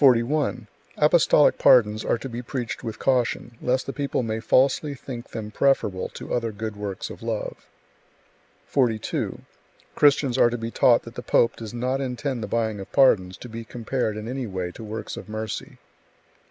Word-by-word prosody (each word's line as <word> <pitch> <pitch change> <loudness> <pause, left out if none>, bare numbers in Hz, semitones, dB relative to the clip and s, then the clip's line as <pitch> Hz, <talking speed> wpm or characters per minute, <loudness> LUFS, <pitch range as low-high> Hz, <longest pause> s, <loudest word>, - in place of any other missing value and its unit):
41. 125 -1 +3 0.3
Apostolic 150 -1 +5
pardons 110 -3 +5
are - - +1
to 135 - -6
be 120 -1 -5
preached 120 -2 -4
with 110 - -5
caution, 120 -2 0
lest 125 +1 0
the 135 - -4
people 140 -3 -1
may 110 -1 -2
falsely 135 +5 +2
think 130 -3 -8
them 105 -1 -6
preferable 105 -7 +1
to - - -6
other 115 -2 0
good 110 0 -5
works 100 -2 -5
of - - -10
love. 115 -2 -4 1.0
42. 120 -6 -1 0.5
Christians 140 -3 +3
are 120 - +6
to 120 - -3
be 115 0 -5
taught 120 0 +4
that 115 - -10
the - - -6
pope 115 - +3
does 110 -2 -7
not 125 +3 -1
intend 130 -1 -3
the 105 - -3
buying 110 -3 -1
of 95 - -9
pardons 95 -10 +4
to - - -9
be 115 0 -7
compared 115 -1 -2
in 110 +1 -6
any 130 0 -3
way 95 -3 -4
to 110 - -10
works 110 +1 -6
of - - -9
mercy. 110 0 -5
120 Hz, 180 wpm, -24 LUFS, 110-130 Hz, 1.0 s, are